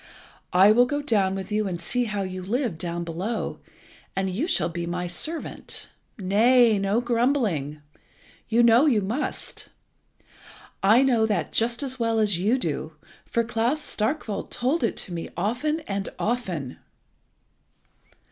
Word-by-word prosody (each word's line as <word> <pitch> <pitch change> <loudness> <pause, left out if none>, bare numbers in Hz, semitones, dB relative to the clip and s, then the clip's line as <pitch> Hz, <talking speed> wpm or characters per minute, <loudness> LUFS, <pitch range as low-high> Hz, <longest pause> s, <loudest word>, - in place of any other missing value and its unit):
I 190 +3 +6
will 245 +3 +5
go 290 +2 -1
down 205 -9 +1
with 195 +1 -6
you 210 0 +1
and 175 -2 -3
see 245 +8 0
how 205 -3 -2
you 185 0 -5
live 215 - -2
down 170 0 -2
below, 180 +8 -3 0.6
and 190 -1 -1
you 240 - -1
shall - - +1
be 170 0 -4
my 180 +1 -2
servant. 310 - -3 0.3
Nay, 220 +3 +4
no 200 +4 +1
grumbling. 230 - 0 0.7
You 230 +1 +4
know 235 +5 +6
you 230 -7 +3
must. 230 +10 -3 1.1
I 220 +7 +5
know 235 -5 +3
that 205 -4 -1
just 235 +4 +1
as 260 -2 -3
well 230 -1 +1
as 205 -5 +2
you 215 +8 +2
do, 160 - -3 0.3
for 235 - +1
Klas 235 +5 0
Starkwolt 220 -5 -2
told 265 +6 0
it 230 - 0
to 180 - -8
me 165 -1 -5
often 250 - -1
and 200 -8 -4
often!" 185 - -3
215 Hz, 145 wpm, -25 LUFS, 185-245 Hz, 1.1 s, I